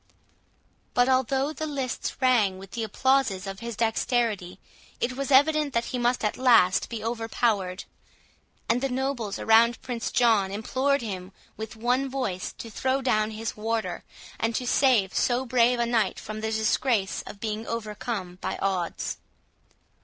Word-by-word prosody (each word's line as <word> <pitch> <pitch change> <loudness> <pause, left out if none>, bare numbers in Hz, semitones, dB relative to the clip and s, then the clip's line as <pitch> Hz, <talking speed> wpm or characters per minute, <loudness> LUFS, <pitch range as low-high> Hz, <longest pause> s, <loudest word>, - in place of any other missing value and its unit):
But 245 0 +4
although 265 +3 +1
the 315 0 -4
lists 270 -5 -3
rang 235 -8 +3
with 195 0 -11
the 235 - -4
applauses 225 -3 +1
of 195 0 -6
his 235 -1 -5
dexterity, 220 -4 0 0.4
it 245 +1 -1
was 275 +1 -3
evident 290 +1 +4
that 235 0 +1
he 250 - -1
must 240 -1 +1
at 210 - -1
last 230 -8 +4
be 230 -2 -5
overpowered; 225 -5 -1 0.8
and 235 +2 +2
the 270 - 0
nobles 255 -5 -2
around 230 +1 +4
Prince 240 -2 -3
John 220 -5 +3
implored 260 +6 0
him 190 -3 -5 0.2
with 220 0 -7
one 250 +4 0
voice 230 -9 -3
to 230 - -9
throw 265 +4 0
down 215 -4 +2
his 220 +1 -5
warder, 225 +1 -2 0.4
and 225 0 0
to 250 - -1
save 245 -7 +3
so 250 +1 +1
brave 245 0 +3
a 235 - +1
knight 235 -2 +1
from 215 0 -6
the 220 0 -2
disgrace 220 -1 +1
of 200 - -9
being 220 +1 -4
overcome 210 -4 -4
by - - -3
odds. 185 -3 -2
230 Hz, 155 wpm, -26 LUFS, 210-255 Hz, 0.8 s, But